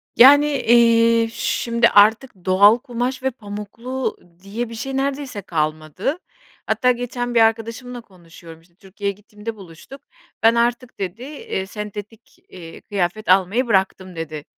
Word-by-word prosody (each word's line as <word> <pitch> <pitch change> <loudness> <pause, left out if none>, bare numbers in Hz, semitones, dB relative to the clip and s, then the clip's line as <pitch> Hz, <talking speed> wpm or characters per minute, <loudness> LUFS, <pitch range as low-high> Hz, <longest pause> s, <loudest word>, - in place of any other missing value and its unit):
Yani, 285 +4 +8
eee, 230 -4 +4
şimdi, 235 0 +1
artık 220 +5 +4
doğal 200 +4 +6
kumaş 250 0 -4
ve 265 - 0
pamuklu 230 +4 -6 0.3
diye 225 +4 -5
bir 230 - -8
şey 270 +4 -4
neredeyse 270 -5 -3
kalmadı. 155 - -2 0.5
Hatta 250 -2 +2
geçen 245 0 -4
bir 230 - +5
arkadaşımla 230 +2 -1
konuşuyorum, 170 -4 -16
işte, 170 +1 -29
Türkiye’ye 200 +1 -5
gittiğimde 210 +2 -9
buluştuk. 195 - -13 0.4
"Ben 230 +1 +5
artık," 240 +1 -1
dedi, 195 +5 -5
eee, 270 -9 -5
"sentetik, 210 - -9
eee, 165 -3 -11
kıyafet 195 +1 -3
almayı 195 +7 +3
bıraktım." 190 -3 0
dedi. 155 -2 -6
225 Hz, 130 wpm, -20 LUFS, 190-245 Hz, 0.5 s, Yani